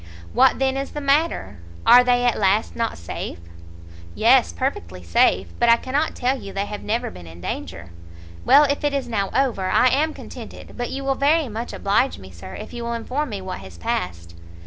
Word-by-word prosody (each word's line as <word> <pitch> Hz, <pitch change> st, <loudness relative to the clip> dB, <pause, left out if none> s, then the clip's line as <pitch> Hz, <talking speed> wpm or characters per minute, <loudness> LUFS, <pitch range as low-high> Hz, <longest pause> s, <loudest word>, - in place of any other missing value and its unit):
"What 260 Hz, 0 st, +4 dB
then 270 Hz, 0 st, 0 dB
is 275 Hz, 0 st, -4 dB
the 295 Hz, -, -4 dB
matter? 280 Hz, -, 0 dB, 0.3 s
Are 250 Hz, -, +8 dB
they 245 Hz, 0 st, +2 dB
at 240 Hz, -, +2 dB
last, 205 Hz, +2 st, +1 dB
not 230 Hz, -1 st, -2 dB
safe?" 85 Hz, +1 st, -6 dB, 0.8 s
"Yes, 85 Hz, -, +4 dB
perfectly 85 Hz, +1 st, -4 dB
safe; 85 Hz, +1 st, +2 dB
but 235 Hz, -, +4 dB
I 230 Hz, -, +7 dB
cannot 280 Hz, +6 st, -1 dB
tell 255 Hz, +1 st, -1 dB
you 195 Hz, -, -8 dB
they 195 Hz, +1 st, -1 dB
have 210 Hz, 0 st, -7 dB
never 235 Hz, +3 st, -2 dB
been 85 Hz, -, -12 dB
in 80 Hz, +1 st, -12 dB
danger." 85 Hz, 0 st, -6 dB, 0.5 s
"Well, 290 Hz, -, +7 dB
if 285 Hz, +1 st, 0 dB
it 290 Hz, -1 st, +1 dB
is 275 Hz, -, -2 dB
now 200 Hz, -5 st, -1 dB
over 235 Hz, -9 st, 0 dB
I 255 Hz, -, +4 dB
am 305 Hz, +5 st, +1 dB
contented: -, -, -10 dB
but 245 Hz, 0 st, -3 dB
you 275 Hz, +1 st, -5 dB
will 270 Hz, 0 st, +1 dB
very 285 Hz, +1 st, +2 dB
much 225 Hz, +2 st, -5 dB
oblige 210 Hz, +7 st, +1 dB
me, 95 Hz, 0 st, -12 dB
sir, 90 Hz, +2 st, -10 dB
if -, -, -9 dB
you 240 Hz, -, -5 dB
will 235 Hz, 0 st, -3 dB
inform 255 Hz, +5 st, -3 dB
me 205 Hz, -3 st, -5 dB
what 185 Hz, -, -6 dB
has 95 Hz, -3 st, -12 dB
passed." 85 Hz, 0 st, -3 dB
235 Hz, 205 wpm, -22 LUFS, -, 0.8 s, Are